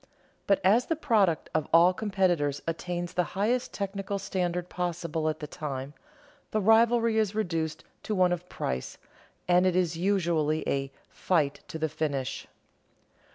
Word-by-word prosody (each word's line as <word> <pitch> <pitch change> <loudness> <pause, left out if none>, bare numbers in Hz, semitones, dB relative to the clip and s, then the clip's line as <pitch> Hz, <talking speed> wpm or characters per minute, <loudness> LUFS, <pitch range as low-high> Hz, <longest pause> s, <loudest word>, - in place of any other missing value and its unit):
But 200 - +4
as 215 +7 +4
the 325 - +1
product 205 - +1
of 155 -1 0
all 170 +3 +6
competitors 180 -9 0
attains 175 +1 -3
the 180 - +2
highest 235 +5 +1
technical 200 0 -3
standard 180 -2 -2
possible 170 -3 -2
at 155 0 -4
the - - -3
time, 140 -2 -5 0.6
the 215 - 0
rivalry 225 +1 +4
is 215 -1 0
reduced 165 -7 -2 0.2
to 215 - -3
one 180 -1 +3
of 175 +1 -6
price, 65 0 -4 0.5
and 180 +1 +4
it 180 - +1
is 175 -3 +1
usually 170 -5 +1
a 135 0 -1 0.2
"fight 155 -6 0
to - - -6
the 160 0 0
finish." 145 -4 -3
175 Hz, 150 wpm, -28 LUFS, 155-200 Hz, 0.6 s, all